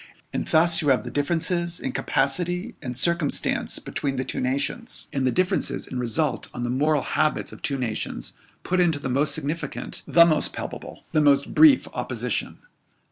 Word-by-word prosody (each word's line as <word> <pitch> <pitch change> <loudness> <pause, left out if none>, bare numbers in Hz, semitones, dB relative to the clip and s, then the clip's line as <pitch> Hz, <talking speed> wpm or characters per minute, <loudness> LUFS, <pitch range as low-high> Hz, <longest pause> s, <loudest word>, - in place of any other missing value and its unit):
And - - -3
thus 170 +2 +4
you 150 - -2
have 130 -2 +3
the - - -7
differences 170 +3 0
in 130 - -3
capacity 180 - -1
and 125 -4 -4
circumstance 170 +1 +2
between 135 -2 -3
the 130 0 -2
two - - -4
nations, 140 - -1
and 135 -2 0
the - - +2
differences 180 -6 0
in 130 - -5
result 130 +5 -1
on 120 - -4
the 120 - -1
moral 145 +2 +1
habits 155 +2 0
of - - -12
two 140 - -1
nations, 120 -4 -4 0.3
put 185 0 0
into 170 -4 +2
the 140 -2 -5
most 140 +4 +2
significant 160 +2 -3
the 170 -1 +7
most 155 -2 +1
palpable - - -7
the 155 - +2
most 140 -1 +3
brief 305 -4 +6
opposition. - - -2
150 Hz, 175 wpm, -24 LUFS, 135-170 Hz, 0.3 s, the